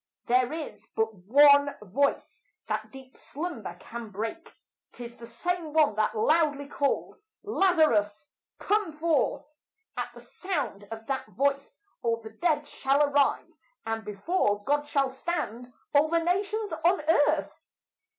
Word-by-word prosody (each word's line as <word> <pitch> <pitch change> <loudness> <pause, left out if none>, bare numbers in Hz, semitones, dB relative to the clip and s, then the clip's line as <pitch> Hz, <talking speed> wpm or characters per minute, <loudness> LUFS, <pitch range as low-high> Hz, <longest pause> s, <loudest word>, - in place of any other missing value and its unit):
There 250 +1 +2
is 315 -1 -7
but 220 0 0
one 285 +9 +5
voice 240 +8 -1 0.2
that - - -3
deep 265 -1 -13
slumber 280 - -6
can 235 -1 -8
break, 225 - -5 0.4
'Tis 240 -1 -9
the 235 - -10
same 325 +6 -3
one 310 -7 +4
that 215 +1 0
loudly 290 +3 +2
called, 280 -1 -1 0.3
"Lazarus, 305 - +2 0.3
come 415 -4 0
forth!" 305 -3 0 0.5
At - - -3
the - - -10
sound 275 - -4
of 225 0 -8
that 270 -2 -3
voice 275 - -1 0.2
all 230 -2 +1
the 220 -1 -10
dead 300 +4 0
shall 275 +1 +2
arise, 285 -1 +1 0.2
And 225 0 -3
before 205 - 0
God 290 +3 0
shall 275 -2 +1
stand 250 -5 -4 0.2
all 295 +2 +4
the 335 - +2
nations 400 +3 -1
on 350 0 +3
earth. 305 0 +2
280 Hz, 135 wpm, -28 LUFS, 225-315 Hz, 0.5 s, one